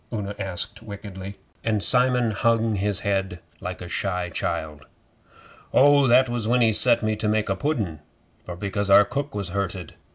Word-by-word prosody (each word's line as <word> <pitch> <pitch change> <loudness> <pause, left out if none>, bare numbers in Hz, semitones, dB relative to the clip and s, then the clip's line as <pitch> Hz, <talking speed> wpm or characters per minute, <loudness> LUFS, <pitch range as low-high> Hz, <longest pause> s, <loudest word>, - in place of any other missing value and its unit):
Una 105 -3 -4
asked 95 0 -5
wickedly, 100 -2 -8 0.3
and 110 -3 0
Simon 125 -2 +3
hung 115 +1 +1
his 100 0 -1
head 95 -3 -1 0.2
like - - -6
a - - -7
shy 90 0 -2
child. 75 -2 -4 0.8
'Oh, 140 0 +5
that 130 +2 +5
was 120 -2 -3
when 125 +1 +2
he 110 -2 +4
set 115 +2 +3
me 110 0 0
to 110 0 -3
make 105 -1 0
a 95 - +1
pudden, 105 - -2 0.4
for 90 - -7
because 100 +2 -3
our 100 +1 +7
cook 140 -3 -4
was 100 -3 -3
hurted. 95 -2 -4
105 Hz, 170 wpm, -24 LUFS, 95-115 Hz, 0.8 s, our